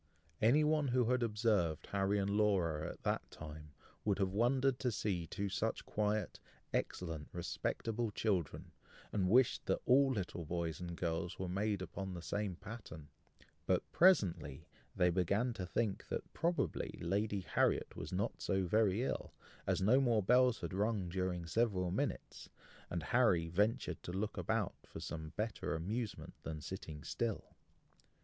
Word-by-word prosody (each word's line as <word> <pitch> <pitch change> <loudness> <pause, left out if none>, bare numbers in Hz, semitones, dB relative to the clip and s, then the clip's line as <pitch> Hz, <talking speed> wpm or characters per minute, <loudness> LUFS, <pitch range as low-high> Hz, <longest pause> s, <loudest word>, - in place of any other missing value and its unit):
Any 130 +8 +5
one 150 -1 +2
who 125 -1 +2
had 125 0 +2
observed 105 -8 +1
Harry 100 +1 +2
and 100 0 0
Laura 95 -7 +2
at - - -10
that - - -1
time, 75 -1 -9 0.3
would 100 -2 +1
have 95 -1 0
wondered 130 +4 +2
to 125 - +1
see 95 -6 -1
two 100 +6 -2
such 95 - -1
quiet, 105 -2 -1 0.3
excellent, 80 -4 -2
respectable 115 +6 -2
children, 100 -6 -1 0.4
and 95 -3 +2
wished 125 +4 +4
that - - +2
all 135 +2 +5
little 90 -6 -3
boys 85 -1 -2
and 85 -1 -4
girls 85 0 -2
were 95 - -3
made 100 +1 0
upon 95 0 -5
the 85 - -7
same 100 -2 -2
pattern; 85 -8 -9 0.6
but - - +3
presently 85 - +3 0.3
they 90 0 +4
began 100 +8 +1
to 95 -5 -5
think 100 +3 -1
that - - -4
probably 170 +1 -1
Lady 100 +3 0
Harriet - - +1
was 75 - -6
not 100 +5 -2
so 95 -1 +1
very 105 +3 +2
ill, - - -3 0.3
as - - +1
no 125 +7 +5
more 115 -5 +3
bells 125 +3 +4
had - - -4
rung 100 -2 0
during 90 -1 -2
several 90 -1 +1
minutes, - - -3 0.4
and 85 -2 -2
Harry 95 -6 +3
ventured 105 +7 +1
to - - -6
look 100 +4 -2
about 110 -3 0
for - - -9
some 80 -2 -5
better 105 -4 -2
amusement 105 +7 -3
than 80 -1 -5
sitting 75 -2 -7
still. 115 +2 -3
100 Hz, 155 wpm, -36 LUFS, 85-115 Hz, 0.6 s, Any